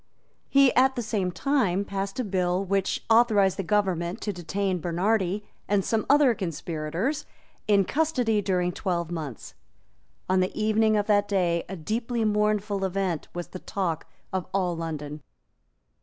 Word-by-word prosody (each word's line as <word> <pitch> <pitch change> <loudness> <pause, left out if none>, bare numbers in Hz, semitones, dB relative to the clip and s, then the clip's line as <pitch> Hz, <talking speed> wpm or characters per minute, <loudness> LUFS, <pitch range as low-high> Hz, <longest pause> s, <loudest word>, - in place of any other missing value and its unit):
He 275 -2 +5
at 265 +1 +4
the 240 - -2
same 205 -5 -1
time 200 -6 +1
passed 195 +2 -4
a - - +1
bill 185 -2 0
which 195 0 -1
authorised 220 -4 +4
the - - 0
government 185 -1 0
to 205 - -2
detain 185 +1 -2
Bernardi 190 +3 0 0.2
and 200 -2 +1
some 220 -2 0
other 285 -3 +6
conspirators 170 - -3 0.4
in 200 -2 +4
custody 250 - +1
during 180 -2 0
twelve 175 -2 -2
months. 155 -8 -6 0.7
On 185 0 +3
the 185 +3 -1
evening 215 0 +3
of 205 - +1
that 205 -1 +3
day 175 -4 +1
a 190 - -4
deeply 225 +6 -2
mournful 210 -1 +1
event 190 -4 -1
was 175 -1 -5
the 185 - -8
talk 175 -6 -3 0.3
of 185 -2 -2
all 180 -3 +1
London. 155 -2 -5
195 Hz, 150 wpm, -26 LUFS, 175-215 Hz, 0.7 s, other